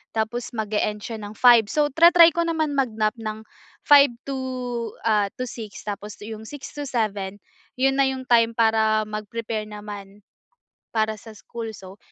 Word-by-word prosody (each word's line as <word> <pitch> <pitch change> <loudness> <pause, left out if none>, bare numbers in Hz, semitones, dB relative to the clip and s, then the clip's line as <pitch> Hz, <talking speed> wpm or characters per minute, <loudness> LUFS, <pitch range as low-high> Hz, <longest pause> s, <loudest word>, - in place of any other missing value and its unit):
tapos 220 +2 -2
mag-e-end 210 -1 -2
siya 225 -2 -6
ng 205 0 -8
5:00. 235 -2 +6
So, 295 +5 +1
tra-try 335 +2 +7
ko 340 +1 -1
naman 315 -3 0
mag-nap 230 -4 0
ng, 215 0 -5 0.4
5:00 285 -3 +6 0.2
to, 270 - -2 0.7
ah, 215 -2 +3
to 255 - -4
6:00 225 -4 -8
tapos 210 0 -6
yung 220 0 -8
6:00 290 +1 -8
to 290 -1 -6
7:00, 205 -5 -2 0.4
'yon 270 +1 +1
na 275 - +5
yung 265 -1 -3
time 230 -1 +4
para 220 -1 +3
mag-prepare 215 +1 -4
naman, 205 -1 -9 0.7
para 220 -1 +1
sa 225 0 -12
school. 225 +1 -7
So, 190 0 -12
220 Hz, 160 wpm, -23 LUFS, 215-255 Hz, 0.7 s, tra-try